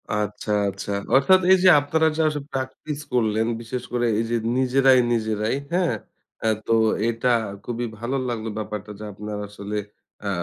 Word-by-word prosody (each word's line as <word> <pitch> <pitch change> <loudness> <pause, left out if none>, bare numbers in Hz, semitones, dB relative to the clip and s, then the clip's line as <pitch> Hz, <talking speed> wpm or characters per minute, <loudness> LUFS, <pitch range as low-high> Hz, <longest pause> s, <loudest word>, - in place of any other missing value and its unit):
আচ্ছা, 105 0 -3 0.2
আচ্ছা। 100 +1 -6 0.2
অর্থাৎ 185 +8 +6
এই 190 - +8
যে, 185 - +8
আপনারা 160 +2 +2
যা 160 - +3 0.3
প্র্যাকটিস 135 +3 -4
করলেন, 110 -2 +2 0.2
বিশেষ 120 +2 -5
করে 120 0 +1
এই - - +1
যে, - - +2 0.2
নিজেরাই, 130 0 +4
নিজেরাই, 110 +1 0 0.2
হ্যাঁ? 180 -1 +2 0.5
আ - - +3 0.2
তো 115 - +4 0.3
এটা 120 +2 +1 0.3
খুবই 120 0 -3
ভালো 125 +4 -2
লাগলো 115 -1 -3
ব্যাপারটা 105 -1 -5
যে, - - -7
আপনারা 105 +1 -6
আসলে 105 +1 -5 0.5
আ - - 0
115 Hz, 155 wpm, -23 LUFS, 105-130 Hz, 0.5 s, এই